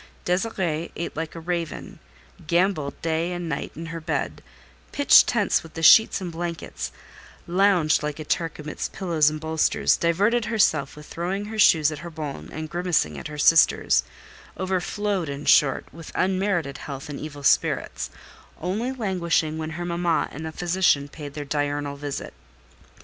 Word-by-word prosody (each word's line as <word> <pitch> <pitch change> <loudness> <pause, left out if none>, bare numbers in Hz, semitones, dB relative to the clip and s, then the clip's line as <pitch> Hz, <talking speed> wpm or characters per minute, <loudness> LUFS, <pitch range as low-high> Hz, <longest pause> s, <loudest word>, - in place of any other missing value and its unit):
Désirée 180 -4 -1
eat 170 - -5
like 160 +1 -4
a - - -6
raven, 170 0 -4 0.5
gambolled 170 -4 +1
day 165 +1 0
and 175 -1 -4
night 165 - -3
in 165 - -7
her 165 - -5
bed, - - -3 0.5
pitched - - +6
tents - - +2
with 165 - -14
the 165 - -5
sheets 220 +6 +7
and 180 -3 -5
blankets, 170 0 -5 0.5
lounged 180 -3 +3
like 150 -1 -3
a 155 - -6
Turk 165 +1 -2
amidst 150 0 -5
pillows 165 -6 +2
and 155 0 -5
bolsters, 160 0 +2
diverted 205 +8 +2
herself 215 -11 +1
with 150 0 -11
throwing 185 +6 -3
her 220 +1 -6
shoes 160 -7 +5
at 150 - -6
her 170 +2 -7
bonne 145 - -6
and 155 0 -5
grimacing 170 - 0
at - - -6
her 150 -1 -8
sisters—over 180 +3 +1
flowed, 200 -4 -2
in 140 +1 -6
short, 135 -3 +4
with 165 +1 -10
unmerited 185 -6 0
health 135 -2 -7
and 145 -2 -6
evil 145 -2 -8
spirits; - - +1 0.5
only 205 +9 -2
languishing 170 -9 -1
when 155 0 -3
her 175 - -4
mamma 170 -1 0
and 160 +2 -6
the - - -5
physician 175 -4 +1
paid 145 -2 -9
their 145 -1 -5
diurnal 145 0 -2
visit. 145 0 -6
165 Hz, 160 wpm, -24 LUFS, 150-180 Hz, 0.5 s, sheets